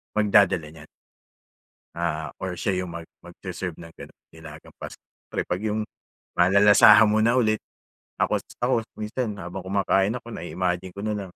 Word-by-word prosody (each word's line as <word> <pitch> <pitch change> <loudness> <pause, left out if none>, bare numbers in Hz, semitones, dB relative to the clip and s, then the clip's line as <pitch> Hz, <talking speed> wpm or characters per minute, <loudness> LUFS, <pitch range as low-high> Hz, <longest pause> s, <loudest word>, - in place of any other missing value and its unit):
magdadala 100 -6 +3
niyan. 75 -1 -13 1.1
Ah, 80 -2 -2 0.2
or 90 -2 -4
siya 100 - 0
'yung 90 - -7
mag 85 -1 -8 0.2
mag-se-serve 90 -4 -7
ng 85 - -10
ganun - - -13 0.2
nilagang 80 -1 -13
Pasko, - - -9
siyempre - - -7
'pag 90 +3 -2
'yung 110 0 -2 0.5
malalasahan 105 +4 +7
mo 105 - +2
na 115 +2 +3
ulit 110 -4 +2 0.6
ako - - 0 0.2
ako 125 +2 +2 0.2
minsan 110 +1 -4
habang 90 -1 -7
kumakain 100 +2 +1
ako 120 -1 -8
na-iimagine 90 -1 -3
ko 100 - -7
nalang 105 -4 -4
95 Hz, 150 wpm, -24 LUFS, 90-105 Hz, 1.1 s, malalasahan